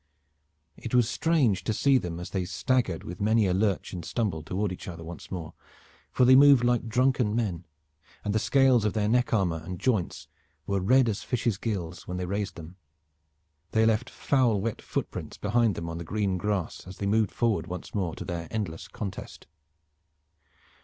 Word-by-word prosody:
It 115 - -4
was 120 -3 +4
strange 125 - +1
to 110 - -1
see 135 +2 +4
them 85 -4 -5
as 90 - -7
they 95 -2 -1
staggered 95 +2 0
with 90 +3 -8
many 110 +1 +3
a 90 - +1
lurch 100 0 0
and 90 -2 -5
stumble 100 -6 -2
toward 95 +5 -2
each 90 - -8
other 85 -2 -7
once 85 +1 -9
again, 85 -5 -6 0.6
for 125 - +3
they 130 +1 +7
moved 140 -2 +7
like 120 -1 +1
drunken 125 -2 +2
men, 95 -7 -2 0.6
and 105 - 0
the 110 - +2
scales 130 -2 +4
of 105 - 0
their 105 -2 0
neck 125 +3 +2
armor 90 -7 +1
and 90 +2 -6
joints 110 -9 -1 0.4
were 100 -1 0
as 90 - -4
red 130 +3 +5
as 110 -3 -1
fishes' 120 -5 -1
gills 90 -7 -4
when 90 - -4
they 90 - -2
raised 100 0 -3
them 85 +2 -10 1.0
They 110 0 +4
left 110 -1 +1
foul 125 -7 +1
wet 110 +3 -3
footprints - - -5
behind 115 -1 +1
them 85 - -5
on 85 0 -5
the - - -5
green 100 +1 -1
grass 100 -4 -2
as 95 - -9
they 100 - -3
moved 105 0 +2
forward 115 -4 0
once 90 -2 -7
more 90 -5 -1
to - - -7
their 85 -3 -4
endless 90 -6 -4
contest. 100 -1 -7
105 Hz, 190 wpm, -27 LUFS, 90-115 Hz, 1.0 s, they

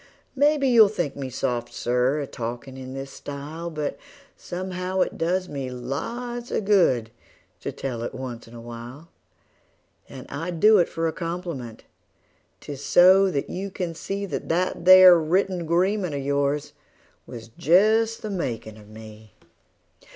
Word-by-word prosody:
Maybe 290 0 +3
you'll 230 -4 +7
think 175 -8 -3
me 135 -2 -5
soft, 125 -2 -3
Sir, 125 +4 0
a - - -3
talkin' 120 +1 -6
in 130 0 -8
this 135 0 -6
style, 150 +4 -7
But 150 -3 -4 0.4
somehow 185 +1 -4
it - - 0
does 180 +2 -1
me 135 -4 -5
lots 235 - -5
of 210 - -2
good 130 - +3 0.5
to - - -5
tell 125 -4 -5
it 120 - -4
once 125 -3 -7
in 115 - -13
a 115 - -9
while; 120 +7 -10 1.0
And 130 -2 -10
I 160 +5 -5
do 205 +5 +5
it 175 - +2
for 165 0 -2
a 160 - -2
compliment 165 -9 -6 0.8
'tis 145 -1 -8
so 190 +4 +6
that 140 -6 -2
you 195 +2 -4
can 180 -3 -4
see 195 +5 -4
That 195 - -5
that 175 +1 -1
there 185 -1 +9
written 180 +3 0
agreement 180 +1 0
of 140 - -3
yours 140 +1 -1 0.5
was 115 -1 -9
just 215 - +2
the 215 - -4
makin' 115 - -4
of 105 -1 -16
me. 110 -1 -13
160 Hz, 155 wpm, -24 LUFS, 130-185 Hz, 1.0 s, there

